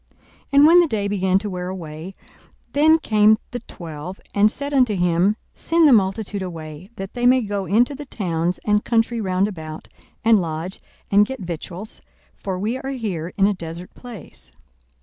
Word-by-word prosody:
42:009:012 - - -34 0.3
And 280 +1 +7
when 340 +3 +8
the 345 - +4
day 210 -6 -1
began 190 -2 +1
to 210 +2 -3
wear 180 -1 -4
away, 170 0 -7 0.6
then 310 +3 +5
came 215 -6 +4
the 245 - -4
twelve, 170 -3 -9
and 205 +1 +4
said 285 +3 -5
unto 250 -6 +3
him, 180 +3 +2 0.2
Send 330 -1 +3
the 280 - +7
multitude 200 -1 +1
away, 165 -1 -7
that 195 -2 -7
they 245 0 +1
may 255 +1 +5
go 200 -2 -3
into 235 - +3
the 290 +1 -8
towns 175 -6 -1
and 210 0 +2
country 230 0 +1
round 190 0 +1
about, 160 -6 -8 0.4
and 225 -3 +5
lodge, 165 +2 -4 0.3
and 205 +1 +6
get 265 -4 -6
victuals: 180 +3 -7 0.3
for 190 -2 -4
we 220 +7 -2
are 270 - -5
here 195 -11 -4
in 195 - +4
a 205 - +3
desert 170 0 -8
place. 240 -8 -12
200 Hz, 180 wpm, -22 LUFS, 180-235 Hz, 0.6 s, when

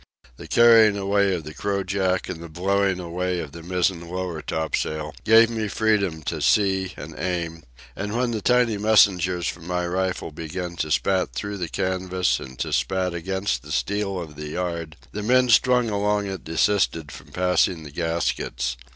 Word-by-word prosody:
The - - -10
carrying 115 -3 +6
away 100 0 +2
of 85 - -5
the 75 +1 -8
crojack 95 -1 -1
and 85 - -6
the 85 - -8
blowing 95 +3 0
away 90 +1 -2
of 75 -4 -6
the 85 +2 -10
mizzen 90 0 -1
lower 90 -3 -4
topsail 80 0 -2
gave 115 +1 +6
me 110 -2 -2
freedom 100 -7 0
to - - -3
see 95 -3 +2
and - - -8
aim, 85 -2 -3 0.3
and 105 +2 -4
when 125 -1 +1
the 110 -2 -3
tiny 120 -2 +2
messengers 95 -5 +3
from 85 -1 -6
my 90 0 -1
rifle 90 -1 -2
began 85 +3 -5
to 75 - -2
spat 95 +4 +1
through 100 -1 -4
the 85 -2 -3
canvas 95 -1 0
and 65 -1 -10
to 60 - -3
spat 95 -1 0
against 95 -4 -2
the 75 +2 -11
steel 100 +3 -1
of 75 -4 -8
the 75 0 -6
yard, 85 -2 -4
the 105 - -4
men 125 +3 +3
strung 125 -1 +4
along 105 0 0
it 95 -3 -5
desisted 80 -3 +1
from 70 - -11
passing 90 +1 +1
the 75 - -10
gaskets. 80 -6 -2
90 Hz, 175 wpm, -24 LUFS, 85-100 Hz, 0.3 s, carrying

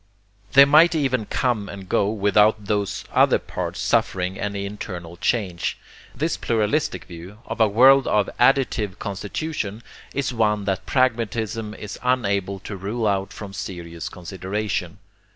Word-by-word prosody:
They 140 0 +9
might 155 +4 +6
even 130 -7 0
come 115 -5 -1
and 95 -2 -9
go 100 +2 +2
without 105 0 +3
those 100 -1 -1
other - - +4
parts - - -5
suffering 95 +1 0
any 100 -1 -3
internal 90 -4 -7
change. 90 -3 -1 0.4
This - - -1
pluralistic 115 +7 0
view, 90 +4 -10
of - - -4
a 110 - +6
world 130 +6 +6
of 105 -2 +2
ADDITIVE 125 -7 +2
constitution, 105 +2 -4 0.3
is 135 -2 -2
one 105 -3 +1
that 95 -2 -2
pragmatism 115 -4 0
is 105 -2 -8
unable 100 -6 0
to 100 - -6
rule 105 +5 -3
out 100 -2 0
from 100 -2 -8
serious 85 -4 -6
consideration. 95 0 -4
105 Hz, 135 wpm, -23 LUFS, 95-115 Hz, 0.4 s, They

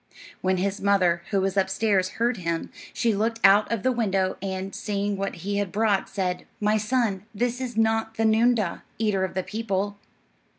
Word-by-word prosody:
When 185 0 +1
his 195 +2 -1
mother, 185 -4 +3
who 195 -2 +1
was 195 0 0
upstairs, 190 0 +1
heard 235 +1 +1
him, 170 -2 -3 0.2
she 230 -2 +1
looked 225 +3 0
out 200 +3 +6
of 230 -4 -1
the 260 - +3
window, 195 -6 0
and, 190 0 -4
seeing 205 -1 -2
what 195 -1 -3
he 200 0 -1
had 200 -3 -1
brought, 210 -2 +1
said, 185 -2 -2
"My 210 +1 +2
son, 215 -3 0
this 245 +3 -1
is 245 -3 -4
not 225 0 +1
the 225 - +2
noondah, 220 -3 +2 0.2
eater 210 -4 +1
of 190 - -3
the 185 - 0
people." 205 -2 -2
200 Hz, 180 wpm, -25 LUFS, 190-225 Hz, 0.2 s, out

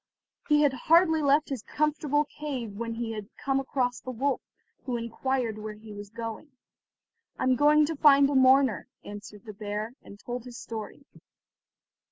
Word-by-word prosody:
He 300 0 +5
had 285 -2 +3
hardly 320 +4 +4
left 290 +1 +3
his 270 -5 -3
comfortable 300 +1 0
cave 280 -7 -5
when 230 +1 -4
he 230 -1 -3
had 210 -2 -6
come 270 -1 0
across 255 -2 -1
the - - -9
wolf, 260 +2 -1 0.4
who 250 -2 -1
inquired 235 -1 -2
where 215 0 -6
he 215 0 -12
was 205 0 -9
going. 230 +6 -7 0.9
"I - - -3
am 260 0 +3
going 300 +2 +5
to 325 +2 -3
find 280 -1 +6
a 285 - -1
mourner," 260 -5 +4 0.2
answered 205 +1 -10
the 215 - -8
bear, 210 +2 -4
and 200 - -13
told 245 +1 -6
his 245 -1 -9
story. 225 +5 -7
255 Hz, 170 wpm, -28 LUFS, 225-285 Hz, 0.9 s, find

